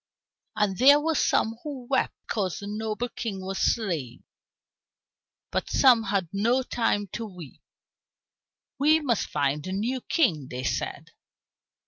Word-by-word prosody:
And 210 Hz, -3 st, 0 dB
there 285 Hz, +3 st, +8 dB
were 320 Hz, +2 st, 0 dB
some 225 Hz, -6 st, +1 dB
who 275 Hz, -5 st, -7 dB
wept 265 Hz, 0 st, 0 dB
because 190 Hz, -5 st, -1 dB
the 200 Hz, -, -7 dB
noble 215 Hz, +3 st, -3 dB
King 220 Hz, -5 st, -5 dB
was 190 Hz, 0 st, -3 dB
slain, 165 Hz, -, -1 dB, 1.3 s
but -, -, -2 dB
some 245 Hz, -5 st, +5 dB
had 195 Hz, -3 st, 0 dB
no 235 Hz, +6 st, +2 dB
time 225 Hz, -4 st, 0 dB
to 230 Hz, -, -4 dB
weep. 180 Hz, -, -10 dB, 1.2 s
"We 305 Hz, +3 st, +5 dB
must 250 Hz, -9 st, 0 dB
find 145 Hz, +2 st, -1 dB
a -, -, -4 dB
new 235 Hz, +7 st, -2 dB
king," 165 Hz, -, +1 dB
they 125 Hz, +1 st, -5 dB
said. -, -, -3 dB
215 Hz, 135 wpm, -26 LUFS, 190-255 Hz, 1.3 s, there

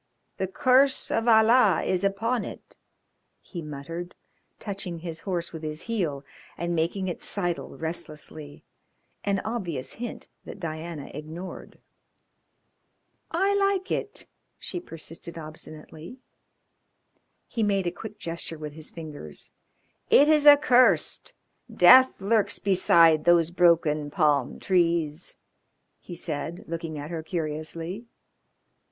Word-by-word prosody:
The 190 Hz, -, -1 dB
curse 260 Hz, +6 st, +3 dB
of 225 Hz, -, 0 dB
Allah 220 Hz, -1 st, +5 dB
is 185 Hz, 0 st, 0 dB
upon 225 Hz, +5 st, 0 dB
it," -, -, -10 dB, 0.6 s
he 175 Hz, -, -8 dB
muttered, 160 Hz, +4 st, -7 dB, 0.4 s
touching 195 Hz, -4 st, -5 dB
his 165 Hz, -1 st, -6 dB
horse 170 Hz, -2 st, -2 dB
with 160 Hz, -, -7 dB
his 155 Hz, 0 st, -5 dB
heel, 165 Hz, -12 st, -2 dB, 0.3 s
and 170 Hz, +1 st, -2 dB
making 170 Hz, +4 st, -1 dB
it 175 Hz, -, -4 dB
sidle 175 Hz, -4 st, -2 dB
restlessly 155 Hz, -2 st, -6 dB, 0.6 s
an 200 Hz, -1 st, 0 dB
obvious 175 Hz, -, -3 dB
hint 240 Hz, +1 st, -7 dB, 0.2 s
that -, -, -10 dB
Diana 160 Hz, -3 st, -6 dB
ignored. 160 Hz, +5 st, -8 dB, 1.5 s
"I 385 Hz, +4 st, +1 dB
like 395 Hz, -1 st, +1 dB
it," 410 Hz, -, -3 dB, 0.3 s
she -, -, -5 dB
persisted 165 Hz, -, -9 dB
obstinately. 155 Hz, +4 st, -10 dB, 1.3 s
He 230 Hz, -, -3 dB
made 200 Hz, -3 st, +1 dB
a 175 Hz, -, 0 dB
quick 210 Hz, +4 st, -9 dB
gesture 165 Hz, -1 st, -5 dB
with 150 Hz, -1 st, -7 dB
his 155 Hz, 0 st, -9 dB
fingers. 150 Hz, -, -8 dB, 0.6 s
"It 285 Hz, -, +7 dB
is 305 Hz, -1 st, +4 dB
accursed. 285 Hz, -4 st, +5 dB, 0.4 s
Death 260 Hz, 0 st, +7 dB
lurks 205 Hz, 0 st, +1 dB
beside 170 Hz, -5 st, +4 dB
those 170 Hz, -1 st, +4 dB
broken 165 Hz, -4 st, +3 dB
palm 145 Hz, -5 st, +1 dB
trees," 170 Hz, -3 st, 0 dB, 0.6 s
he 175 Hz, -, -9 dB
said, 165 Hz, 0 st, -4 dB
looking 165 Hz, -1 st, -5 dB
at 145 Hz, +3 st, -7 dB
her 165 Hz, -2 st, -3 dB
curiously. 165 Hz, +5 st, -5 dB
170 Hz, 115 wpm, -26 LUFS, 155-205 Hz, 1.5 s, It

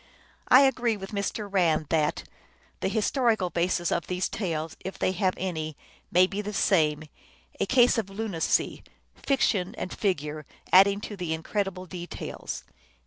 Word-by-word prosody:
I 255 Hz, -, +8 dB
agree 245 Hz, -5 st, +2 dB
with 195 Hz, +1 st, -8 dB
Mr. 205 Hz, +1 st, -3 dB
Rand 170 Hz, -6 st, +2 dB
that 155 Hz, -2 st, +1 dB, 0.3 s
" -, -, -34 dB
the -, -, +1 dB
historical 220 Hz, -2 st, +1 dB
basis 175 Hz, 0 st, 0 dB
of 170 Hz, -, -1 dB
these 180 Hz, 0 st, -1 dB
tales, 165 Hz, -6 st, -3 dB
if 190 Hz, +1 st, -6 dB
they -, -, +1 dB
have 190 Hz, 0 st, 0 dB
any, 160 Hz, -5 st, -3 dB, 0.3 s
may 180 Hz, +1 st, +6 dB
be 200 Hz, +2 st, -4 dB
the 210 Hz, 0 st, -5 dB
same, 155 Hz, -7 st, +2 dB, 0.6 s
a -, -, 0 dB
case 245 Hz, -1 st, +5 dB
of 205 Hz, -3 st, -4 dB
lunacy; 195 Hz, -4 st, -1 dB, 0.3 s
fiction 210 Hz, -9 st, 0 dB
and 180 Hz, -, -4 dB
figure 155 Hz, -6 st, -2 dB, 0.3 s
adding 195 Hz, +2 st, +6 dB
the 180 Hz, -7 st, -3 dB
incred 200 Hz, +5 st, -1 dB
ible 185 Hz, -1 st, -7 dB
details." 175 Hz, -1 st, -6 dB
190 Hz, 150 wpm, -27 LUFS, 170-210 Hz, 0.6 s, I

